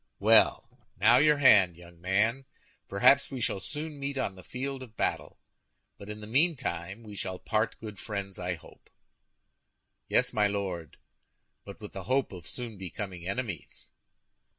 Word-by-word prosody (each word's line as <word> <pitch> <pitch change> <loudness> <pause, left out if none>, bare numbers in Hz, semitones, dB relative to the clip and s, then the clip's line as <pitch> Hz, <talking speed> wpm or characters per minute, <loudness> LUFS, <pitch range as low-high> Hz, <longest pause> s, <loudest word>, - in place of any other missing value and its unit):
"Well, 110 +2 +4 0.2
now, 120 - +6
your 150 +2 +5
hand, 100 -11 +6
young 85 -1 -15
man. 110 +8 +1 0.4
Perhaps 135 +8 +5
we 135 - -5
shall 105 -4 -1
soon 150 - -5
meet 140 0 -3
on 130 -7 -1
the 95 - -12
field 135 +4 -5
of 115 -4 -12
battle; - - -2 0.6
but 100 - -10
in 105 0 -7
the - - -7
meantime 115 - 0
we 105 -2 -10
shall 95 -1 -4
part 110 +3 -1
good 105 -3 -8
friends, 100 -3 -5
I 90 0 -2
hope." 80 - -18 1.2
"Yes, 125 0 +3
my 105 -3 +3
Lord; 95 -6 -4 0.7
but - - -10
with - - -9
the - - -7
hope 130 +1 +1
of 90 -3 -10
soon 115 -5 -7
becoming 95 -1 -6
enemies." 100 - -5
105 Hz, 155 wpm, -29 LUFS, 95-130 Hz, 1.2 s, now